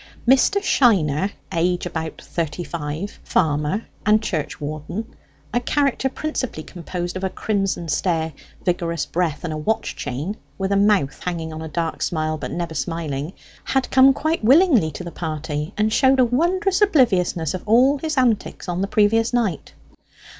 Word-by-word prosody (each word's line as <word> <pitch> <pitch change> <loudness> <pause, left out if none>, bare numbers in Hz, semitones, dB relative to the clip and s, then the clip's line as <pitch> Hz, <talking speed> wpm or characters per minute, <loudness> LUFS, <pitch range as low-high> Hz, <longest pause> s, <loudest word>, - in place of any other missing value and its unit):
Mr. 270 +10 +5
Shiner, 190 - +3 0.2
age 175 +1 +1
about 160 -2 -4
thirty 170 +1 -3
five, 165 +4 -5
farmer 155 +5 0 0.2
and 215 +1 +4
church 155 -8 -3
warden, 155 +9 -5 0.4
a 245 - +3
character 270 +1 +1
principally 260 - -4
composed 175 +1 -5
of 185 - -4
a 190 - +1
crimson 195 -4 -1
stare, 160 -1 0 0.3
vigorous 170 -3 0
breath, 165 -5 -1
and 165 -3 -3
a - - -3
watch 215 +9 -1
chain, 155 - -4 0.2
with 195 0 -2
a - - +3
mouth 200 -8 +2
hanging 165 -3 -3
on 155 - -6
a 160 - -5
dark 165 +1 -3
smile 155 -1 -1
but - - -4
never 170 -1 -3
smiling, 160 -2 -3 0.3
had 265 -1 0
come 265 +1 +7
quite 315 +1 -1
willingly 265 - +5
to 155 - -7
the 170 - -7
party, 155 -2 -4
and 215 +1 +1
showed 265 +1 +4
a 255 - +6
wondrous 360 - +1
obliviousness 190 - +3
of 185 - -4
all 260 +6 +5
his 310 0 -3
antics 240 -7 +1
on 175 +1 -2
the 195 - 0
previous 220 +2 +3
night. 225 - -1
180 Hz, 160 wpm, -22 LUFS, 160-240 Hz, 0.4 s, come